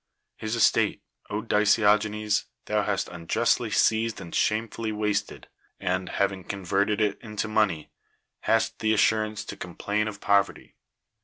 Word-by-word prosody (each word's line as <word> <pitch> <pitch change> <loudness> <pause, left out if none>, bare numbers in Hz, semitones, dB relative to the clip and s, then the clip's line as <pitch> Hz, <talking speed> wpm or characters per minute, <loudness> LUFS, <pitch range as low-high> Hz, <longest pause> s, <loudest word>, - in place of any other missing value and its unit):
His 110 +1 -3
estate, 115 -2 +2 0.3
DiciKogeues, 105 0 +2 0.2
thou - - +1
hast - - -1
unjustly 85 -1 0
seized 110 0 +2
and 85 -3 -9
shamefully 110 0 0
wasted, 105 -1 -2 0.3
and, 90 0 -1
having 95 -2 -1
con 100 +1 -6
verted 100 +3 +1
it 105 -2 +1
into 105 -1 -4
money, 105 -8 0 0.5
hast 115 0 +1
the 110 0 +2
assurance 110 0 +1
to - - -7
coni' 90 -1 -9
plain 105 +1 -1
of 105 -2 -6
poverty. 100 -1 +1
105 Hz, 135 wpm, -26 LUFS, 100-110 Hz, 0.5 s, estate